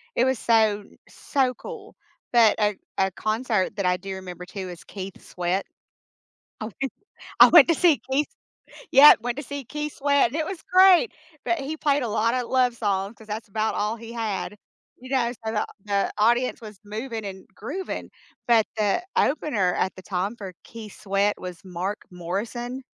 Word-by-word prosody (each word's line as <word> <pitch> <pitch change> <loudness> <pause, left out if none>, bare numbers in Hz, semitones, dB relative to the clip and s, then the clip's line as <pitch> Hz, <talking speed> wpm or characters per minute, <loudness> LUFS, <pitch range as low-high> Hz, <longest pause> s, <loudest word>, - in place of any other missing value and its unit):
It 240 - +3
was 260 -3 +1
so, 220 -3 +3 0.3
so 265 -3 0
cool. 475 -1 -10 0.4
But 230 -3 +6
a 210 -1 +2 0.2
a 190 0 +2
concert 215 -1 -1
that 200 -2 -2
I 180 0 +2
do 195 +1 -7
remember 180 -1 -8
too 190 -1 -7
is 175 - -10
Keith 195 -1 -8
Sweat. 180 +2 -2 1.0
I - - -2 0.2
went 270 - -2 0.5
I - - +12
went - - +8
to 335 - +4
see 330 -3 +3
Keith 285 +3 +2 0.6
Yep, 280 -1 +9
went 245 +2 -3
to 290 - -4
see 285 0 -6
Keith 300 +3 -5
Sweat, 285 -2 +3
and - - -6
it 315 -1 0
was 380 -3 -6
great, 380 +4 +7 0.3
but 345 - +1
he 280 +3 -4
played 285 -2 +1
a - - -1
lotta 230 +3 +1
love 250 -2 +2
songs 200 0 -1
'cause 220 - -15
that's 215 0 -5
about 220 +2 -1
all 210 +2 -1
he 230 0 -10
had. 210 -3 -3 0.4
You 255 +1 -11
know? 240 -3 +1
So 220 - -1
the 215 - 0 0.2
the 200 -1 0
audience 240 +4 +2
was 215 -3 -11
moving 220 +1 -5
and 190 -1 -8
grooving, 320 - -5 0.4
but 230 -2 +5
the 210 - +1
opener 245 - +1
at 190 - -1
the 185 - -10
time 195 +3 -2
for 195 -4 -7
Keith 220 -3 -11
Sweat 200 0 +1
was 180 -1 -8
Mark 185 +3 -3
Morrison. 235 +9 -4
220 Hz, 180 wpm, -25 LUFS, 195-260 Hz, 1.0 s, I